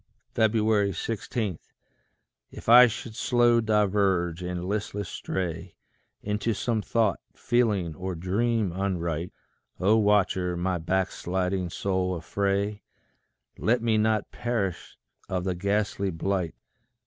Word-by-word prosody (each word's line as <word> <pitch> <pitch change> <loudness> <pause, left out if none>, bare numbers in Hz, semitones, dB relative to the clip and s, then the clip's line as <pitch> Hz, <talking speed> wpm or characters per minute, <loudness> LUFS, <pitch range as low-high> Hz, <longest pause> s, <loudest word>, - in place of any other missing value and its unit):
16. 110 -2 0 0.9
If - - -12
I 125 +2 +9
should 110 0 -6
slow 120 -1 +3
diverge, 100 -5 +1
and 90 0 -4
listless 105 0 -3
stray 85 -1 -4 0.5
Into 105 +2 -1
some 115 +1 -1
thought, 110 -2 +1 0.2
feeling, 105 -9 +1
or 95 +3 -5
dream 105 +4 0
unright, 85 -3 -2 0.5
O 100 +5 +4
Watcher, 95 -4 +2
my 90 0 -1
backsliding 95 +1 -1
soul 95 0 -1
affray; 100 +5 -1 0.8
Let 115 +1 +1
me 110 -2 +2
not 110 -1 +1
perish 110 -7 -3 0.3
of 90 -2 -1
the 95 0 -1
ghastly 100 +1 -1
blight. 90 0 -2
100 Hz, 105 wpm, -27 LUFS, 90-110 Hz, 0.9 s, I